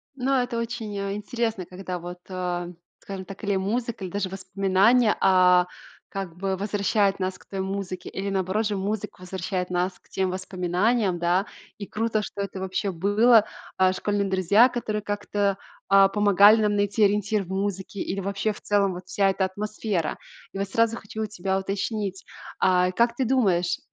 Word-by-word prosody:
Ну 265 Hz, +1 st, -1 dB
это 245 Hz, -2 st, 0 dB
очень, 230 Hz, -3 st, -4 dB
э, 200 Hz, 0 st, -2 dB
интересно, 225 Hz, -3 st, -2 dB
когда 185 Hz, 0 st, -6 dB
вот, 175 Hz, +1 st, -8 dB
а, 180 Hz, -1 st, -3 dB, 0.3 s
скажем 195 Hz, -1 st, -7 dB
так, 195 Hz, +3 st, -10 dB
или 200 Hz, -1 st, +1 dB
музыка, 225 Hz, +3 st, -2 dB
или 180 Hz, -, -7 dB
даже 200 Hz, -1 st, -2 dB
воспоминания, 195 Hz, +4 st, +2 dB
а, 180 Hz, -1 st, +5 dB, 0.4 s
как 190 Hz, -4 st, -5 dB
бы 195 Hz, 0 st, -1 dB
возвращает 200 Hz, 0 st, +1 dB
нас 185 Hz, 0 st, -2 dB
к -, -, -20 dB
той 195 Hz, -, -4 dB
музыке. 190 Hz, -1 st, -4 dB
Или 195 Hz, +1 st, -4 dB
наоборот 195 Hz, +3 st, 0 dB
же, 205 Hz, -, -2 dB
музыка 205 Hz, 0 st, -4 dB
возвращает 185 Hz, 0 st, -3 dB
нас 180 Hz, +1 st, -1 dB
к -, -, -31 dB
тем 190 Hz, -1 st, -1 dB
воспоминаниям, 185 Hz, +2 st, 0 dB
да. 175 Hz, +4 st, +1 dB, 0.3 s
И 200 Hz, -, -6 dB
круто, 225 Hz, 0 st, -1 dB
что 200 Hz, -1 st, -6 dB
это, 195 Hz, -1 st, -5 dB
вообще, 190 Hz, +1 st, -2 dB
было, 210 Hz, +5 st, +4 dB, 0.3 s
а, 185 Hz, 0 st, +4 dB
школьные 200 Hz, +1 st, -1 dB
друзья, 200 Hz, +6 st, +5 dB
которые 215 Hz, -3 st, -3 dB
как-то, 205 Hz, -1 st, -1 dB, 0.3 s
а, 195 Hz, 0 st, +7 dB
помогали 205 Hz, +1 st, +6 dB
нам 210 Hz, -1 st, +2 dB
найти 205 Hz, +1 st, +1 dB
ориентир 210 Hz, +1 st, +2 dB
в 175 Hz, -, -14 dB
музыке, 195 Hz, 0 st, -3 dB
или, 195 Hz, +2 st, -3 dB
вообще, 200 Hz, +2 st, -1 dB
в -, -, -14 dB
целом, 200 Hz, -2 st, +2 dB
вот 180 Hz, +1 st, -9 dB
вся 195 Hz, -1 st, +2 dB
эта 190 Hz, 0 st, 0 dB
атмосфера. 205 Hz, -3 st, -3 dB, 0.3 s
И 195 Hz, -, -5 dB
вот 195 Hz, 0 st, -2 dB
сразу 230 Hz, +2 st, +2 dB
хочу 220 Hz, +1 st, -6 dB
у -, -, 0 dB
тебя 190 Hz, -2 st, -2 dB
уточнить, 195 Hz, 0 st, -3 dB, 0.4 s
а, 180 Hz, 0 st, +3 dB
как 235 Hz, +4 st, +2 dB
ты 260 Hz, 0 st, 0 dB
думаешь, 190 Hz, -9 st, +2 dB
195 Hz, 175 wpm, -25 LUFS, 185-210 Hz, 0.4 s, а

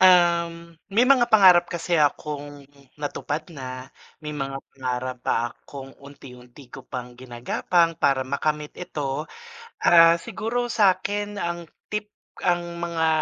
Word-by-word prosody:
Um, 170 Hz, -2 st, +3 dB
may 220 Hz, +5 st, +3 dB
mga 255 Hz, -2 st, +4 dB
pangarap 185 Hz, -6 st, +6 dB
kasi 170 Hz, -1 st, -1 dB
akong 145 Hz, -1 st, -2 dB, 0.3 s
natupad 150 Hz, +1 st, -4 dB
na, 130 Hz, -2 st, -8 dB, 0.3 s
may 150 Hz, 0 st, -5 dB
mga 135 Hz, -2 st, -4 dB, 0.2 s
pangarap 130 Hz, -1 st, -3 dB
pa -, -, 0 dB, 0.2 s
akong 135 Hz, -1 st, -11 dB
unti 140 Hz, -2 st, -13 dB
unti 125 Hz, +2 st, -15 dB
ko 135 Hz, -, -10 dB
pang 125 Hz, -1 st, -6 dB
gina-gapang 130 Hz, +8 st, 0 dB
para 130 Hz, -1 st, +2 dB
makamit 150 Hz, +2 st, -2 dB
ito 150 Hz, -3 st, -4 dB, 0.6 s
ah, 165 Hz, 0 st, +7 dB
siguro 240 Hz, +7 st, -3 dB
sakin 205 Hz, 0 st, +1 dB
ang 170 Hz, -2 st, -4 dB, 0.2 s
tip 210 Hz, 0 st, -2 dB, 0.3 s
ang 175 Hz, -1 st, 0 dB
mga, 165 Hz, -1 st, 0 dB
160 Hz, 125 wpm, -24 LUFS, 135-175 Hz, 0.6 s, ah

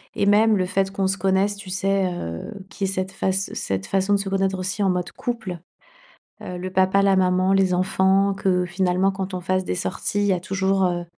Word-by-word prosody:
et 200 Hz, -, +1 dB
même 215 Hz, +2 st, +5 dB
le 185 Hz, -2 st, +1 dB
fait 195 Hz, +1 st, 0 dB
qu'on 195 Hz, -1 st, -1 dB
se 195 Hz, +1 st, -1 dB
connaisse, 195 Hz, +2 st, +1 dB
tu 200 Hz, -2 st, -10 dB
sais, 190 Hz, 0 st, 0 dB
heu, 85 Hz, -, -6 dB, 0.2 s
qu'il 195 Hz, -1 st, -3 dB
y -, -, -2 dB
ait -, -, -3 dB
cette 185 Hz, 0 st, -3 dB
face 190 Hz, 0 st, -2 dB
cette 95 Hz, 0 st, -3 dB
façon 195 Hz, +1 st, +1 dB
de 200 Hz, -, +4 dB
se 195 Hz, 0 st, -3 dB
connaître 195 Hz, 0 st, 0 dB
aussi 190 Hz, +3 st, -3 dB
en 195 Hz, -, +3 dB
mode 180 Hz, -1 st, -1 dB
couple. 220 Hz, -8 st, -5 dB, 0.8 s
Heu, 180 Hz, -, -6 dB
le 185 Hz, +1 st, -5 dB
papa, 190 Hz, +1 st, +3 dB
la 195 Hz, -1 st, +4 dB
maman, 185 Hz, 0 st, +2 dB
les 195 Hz, -1 st, +3 dB
enfants 190 Hz, +2 st, +2 dB
que 185 Hz, -2 st, +1 dB
finalement, 185 Hz, +1 st, +1 dB
quand 190 Hz, 0 st, -5 dB
on 180 Hz, -, -3 dB
fasse 185 Hz, +1 st, -1 dB
des 180 Hz, -, -2 dB
sorties, 200 Hz, +2 st, -3 dB
il 205 Hz, -, +1 dB
y 195 Hz, -, +3 dB
a 180 Hz, -, 0 dB
toujours, 190 Hz, +1 st, 0 dB
heu 175 Hz, -1 st, 0 dB
190 Hz, 230 wpm, -23 LUFS, 185-195 Hz, 0.8 s, même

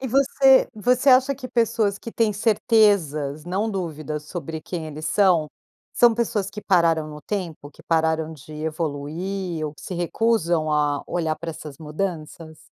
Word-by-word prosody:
E 260 Hz, -, -4 dB
você 270 Hz, +1 st, +4 dB
você 250 Hz, +5 st, +2 dB
acha 260 Hz, +2 st, +5 dB
que 255 Hz, -1 st, -8 dB
pessoas 225 Hz, -4 st, +1 dB
que 230 Hz, -, -8 dB
têm 225 Hz, -2 st, +1 dB
certezas, 200 Hz, -, +2 dB
não 195 Hz, +5 st, -1 dB
dúvidas, 155 Hz, -5 st, -4 dB
sobre 160 Hz, -1 st, -6 dB
quem 160 Hz, 0 st, -5 dB
eles 155 Hz, +1 st, -6 dB
são, 180 Hz, -7 st, +3 dB, 0.4 s
são 240 Hz, -2 st, +5 dB
pessoas 210 Hz, -4 st, -1 dB
que 210 Hz, +1 st, -7 dB
pararam 165 Hz, -5 st, +2 dB
no 150 Hz, 0 st, -9 dB
tempo, 165 Hz, -5 st, -5 dB
que -, -, -18 dB
pararam 160 Hz, -1 st, 0 dB
de 155 Hz, 0 st, -13 dB
evoluir 160 Hz, +3 st, -4 dB
ou 150 Hz, -, -7 dB
que -, -, -16 dB
se 185 Hz, -, -6 dB
recusam 175 Hz, -3 st, 0 dB
a 145 Hz, -1 st, +1 dB
olhar 160 Hz, -3 st, -1 dB
pra 170 Hz, -, -6 dB
essas 150 Hz, -2 st, -10 dB
mudanças? 160 Hz, -1 st, -5 dB
170 Hz, 160 wpm, -23 LUFS, 155-210 Hz, 0.4 s, acha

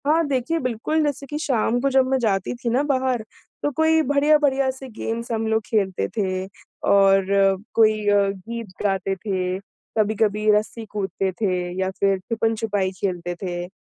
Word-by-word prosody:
हाँ, 320 Hz, +3 st, +4 dB
देखिए 280 Hz, +4 st, 0 dB
बिल्कुल 255 Hz, +5 st, 0 dB
जैसे 285 Hz, -2 st, -2 dB
की 295 Hz, -, -4 dB
शाम 245 Hz, -5 st, +1 dB
को 275 Hz, -, +2 dB
जब 265 Hz, -1 st, +4 dB
मैं 265 Hz, -, +2 dB
जाती 200 Hz, -4 st, 0 dB
थी 240 Hz, -1 st, -3 dB
ना 245 Hz, +4 st, +2 dB
बाहर, 260 Hz, -4 st, 0 dB, 0.4 s
तो 290 Hz, -, +1 dB
कोई 320 Hz, +3 st, +3 dB
बढ़िया 290 Hz, +2 st, +4 dB
बढ़िया 275 Hz, -2 st, +2 dB
से 265 Hz, 0 st, -10 dB
गेम्स 230 Hz, +1 st, -4 dB
हम 225 Hz, -1 st, -1 dB
लोग 220 Hz, 0 st, +1 dB
खेलते 195 Hz, -4 st, 0 dB
थे 185 Hz, -2 st, -1 dB, 0.5 s
और 195 Hz, -1 st, +5 dB
अ, 195 Hz, -1 st, +4 dB, 0.2 s
कोई 215 Hz, -2 st, +3 dB
अ, 205 Hz, -, +4 dB
गीत 225 Hz, +4 st, -6 dB, 0.2 s
गाते 195 Hz, -1 st, 0 dB
थे, 185 Hz, -1 st, -2 dB, 0.4 s
कभी-कभी 215 Hz, 0 st, +1 dB
रस्सी 215 Hz, +2 st, 0 dB
कूदते 195 Hz, -2 st, -2 dB
थे 185 Hz, -4 st, +1 dB, 0.2 s
या 190 Hz, -, 0 dB
फिर 195 Hz, -1 st, +3 dB
छुपन-छुपाई 220 Hz, -2 st, -1 dB
खेलते 175 Hz, -2 st, -2 dB
थे 175 Hz, -2 st, -4 dB
220 Hz, 170 wpm, -23 LUFS, 195-260 Hz, 0.5 s, और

